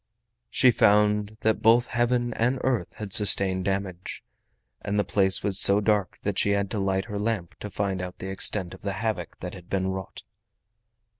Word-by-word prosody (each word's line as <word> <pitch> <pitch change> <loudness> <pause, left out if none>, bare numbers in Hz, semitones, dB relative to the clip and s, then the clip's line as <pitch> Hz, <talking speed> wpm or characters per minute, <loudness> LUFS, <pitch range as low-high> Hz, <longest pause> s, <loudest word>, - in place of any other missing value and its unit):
She 125 - +4
found 105 0 +2
that 110 -1 0
both 115 +2 +4
Heaven 120 0 -1
and 125 +4 0
earth 120 -9 -1
had 105 -3 -6
sustained 95 -2 +4
damage, 95 -2 -4 0.6
and 105 0 -3
the 105 - +2
place 95 -2 +2
was 100 -2 +2
so 100 +1 +6
dark 105 -3 0
that 100 -1 -1
she - - +1
had 100 -1 -3
to 105 - -2
light 95 0 -1
her 105 -3 -5
lamp 105 -5 -3
to 105 - -7
find 95 -1 -3
out 90 0 -7
the 95 - -6
extent 95 -1 -1
of - - -13
the 100 -1 -3
havoc 100 -3 -4
that 90 0 -6
had 90 -1 -13
been 95 -1 -1
wrought. 95 -1 -7
100 Hz, 190 wpm, -25 LUFS, 95-110 Hz, 0.6 s, so